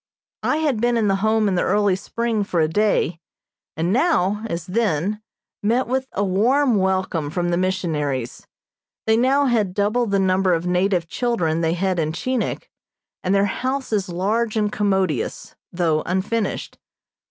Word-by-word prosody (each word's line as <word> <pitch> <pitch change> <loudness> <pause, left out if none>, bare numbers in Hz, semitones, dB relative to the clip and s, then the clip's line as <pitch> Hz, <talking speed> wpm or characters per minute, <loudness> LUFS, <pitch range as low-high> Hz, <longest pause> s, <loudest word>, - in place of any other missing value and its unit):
I 300 - +1
had 290 -8 0
been 240 0 +2
in 215 -3 +2
the 195 - +2
Home 220 +1 +2
in 195 - +1
the 180 - +1
early 205 -1 +2
spring 225 +2 -2
for 180 -3 -1
a 155 - +3
day, 190 -2 +1 0.6
and 170 +4 0
now, 220 - +2
as 170 -1 -3
then, 205 -1 0 0.4
met 235 +5 +1
with 260 +1 -1
a 200 - 0
warm 235 +6 +2
welcome 190 -5 0
from 175 +2 -1
the 175 - +1
missionaries. 150 -9 -2 0.6
They 220 - +3
now 265 +4 +3
had 215 -8 +1
double 215 +4 +1
the 200 -1 +1
number 190 -1 +2
of 165 +1 -3
native 180 -1 +1
children 165 -7 -1
they 165 0 +1
had 185 0 0
in 155 -1 -1
Chinik, 255 +6 -3 0.5
and 190 +2 +1
their 200 0 +3
house 260 +5 -2
is 200 -2 0
large 215 +6 0
and 210 -1 +1
commodious, 190 - -1 0.2
though 165 -3 +1
unfinished. 200 +5 -2
195 Hz, 165 wpm, -22 LUFS, 180-225 Hz, 0.6 s, a